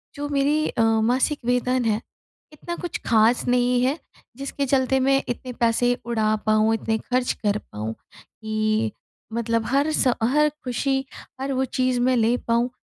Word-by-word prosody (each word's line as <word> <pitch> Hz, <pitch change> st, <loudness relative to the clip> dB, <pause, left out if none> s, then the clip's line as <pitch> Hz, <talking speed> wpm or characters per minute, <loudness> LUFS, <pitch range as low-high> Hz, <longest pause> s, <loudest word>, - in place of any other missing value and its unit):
जो 290 Hz, 0 st, -4 dB
मेरी 290 Hz, +2 st, +1 dB
अ, -, -, -1 dB
मासिक 230 Hz, +6 st, +2 dB
वेतन 250 Hz, 0 st, +1 dB
है 220 Hz, 0 st, +1 dB, 0.5 s
इतना 345 Hz, +3 st, -6 dB
कुछ 345 Hz, -1 st, -5 dB
ख़ास 225 Hz, +1 st, +3 dB
नहीं 245 Hz, 0 st, +2 dB
है, 270 Hz, +4 st, +1 dB, 0.4 s
जिसके 275 Hz, +1 st, -3 dB
चलते 265 Hz, 0 st, +2 dB
मैं 270 Hz, +1 st, +3 dB
इतने 250 Hz, +1 st, -4 dB
पैसे 235 Hz, +1 st, +2 dB
उड़ा 220 Hz, -2 st, +1 dB
पाऊँ, 215 Hz, +1 st, +3 dB
इतने 225 Hz, 0 st, -1 dB
खर्च 250 Hz, +2 st, -1 dB
कर 205 Hz, -1 st, +2 dB
पाऊँ 110 Hz, -, -6 dB, 0.3 s
कि 215 Hz, 0 st, -2 dB, 0.4 s
मतलब 230 Hz, -1 st, 0 dB
हर 280 Hz, +5 st, +1 dB
स 260 Hz, -5 st, +3 dB
हर 300 Hz, +6 st, +3 dB
खुशी, 270 Hz, +2 st, -1 dB, 0.4 s
हर 275 Hz, +1 st, -2 dB
वो 265 Hz, +1 st, +1 dB
चीज़ 255 Hz, -1 st, 0 dB
मैं 255 Hz, +1 st, +3 dB
ले 230 Hz, +1 st, +3 dB
पाऊँ 235 Hz, +1 st, +2 dB
245 Hz, 160 wpm, -23 LUFS, 225-270 Hz, 0.5 s, ख़ास